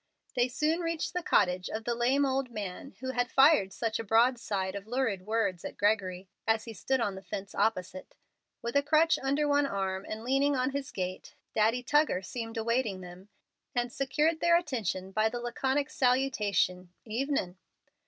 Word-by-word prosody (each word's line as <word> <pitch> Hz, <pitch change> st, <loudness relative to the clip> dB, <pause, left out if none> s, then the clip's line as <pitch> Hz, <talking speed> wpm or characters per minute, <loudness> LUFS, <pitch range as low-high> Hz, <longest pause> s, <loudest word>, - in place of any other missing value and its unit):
They 245 Hz, -1 st, +3 dB
soon 305 Hz, +6 st, 0 dB
reached 330 Hz, -2 st, -2 dB
the 360 Hz, -, -1 dB
cottage 180 Hz, -, +2 dB
of 220 Hz, +1 st, -4 dB
the 240 Hz, -, 0 dB
lame 255 Hz, +4 st, +2 dB
old 265 Hz, -1 st, 0 dB
man 210 Hz, +3 st, -6 dB
who 260 Hz, 0 st, -2 dB
had 245 Hz, -1 st, 0 dB
fired 270 Hz, -9 st, +5 dB
such 225 Hz, +2 st, -2 dB
a -, -, -2 dB
broadside 225 Hz, -4 st, +2 dB
of 200 Hz, +1 st, -7 dB
lurid 225 Hz, -6 st, -1 dB
words 210 Hz, -6 st, 0 dB
at -, -, -7 dB
Gregory, 195 Hz, -3 st, 0 dB, 0.2 s
as 225 Hz, 0 st, +2 dB
he 230 Hz, -, -7 dB
stood 265 Hz, +4 st, 0 dB
on 205 Hz, -4 st, 0 dB
the 190 Hz, -, -8 dB
fence 195 Hz, +1 st, -6 dB
opposite. 185 Hz, -4 st, -1 dB, 0.5 s
With 235 Hz, +2 st, -3 dB
a 280 Hz, -, +5 dB
crutch 310 Hz, +3 st, +3 dB
under 280 Hz, +2 st, +1 dB
one 285 Hz, 0 st, +3 dB
arm 190 Hz, -3 st, -3 dB
and 220 Hz, +1 st, -5 dB
leaning 275 Hz, +3 st, +2 dB
on 255 Hz, +1 st, 0 dB
his 280 Hz, 0 st, -4 dB
gate, 185 Hz, -1 st, -5 dB, 0.2 s
Daddy 225 Hz, +3 st, +2 dB
Tuggar 295 Hz, -7 st, +2 dB
seemed 225 Hz, +2 st, -5 dB
awaiting 225 Hz, -4 st, 0 dB
them, 180 Hz, +2 st, -11 dB, 0.5 s
and 240 Hz, 0 st, 0 dB
secured 300 Hz, +4 st, +1 dB
their 340 Hz, 0 st, +5 dB
attention 220 Hz, -, -3 dB
by 215 Hz, +2 st, +2 dB
the 240 Hz, -, -4 dB
laconic 265 Hz, +4 st, -1 dB
salutation, 210 Hz, -9 st, +1 dB
"Evenin'!" 230 Hz, -5 st, -2 dB
235 Hz, 175 wpm, -30 LUFS, 200-270 Hz, 0.5 s, fired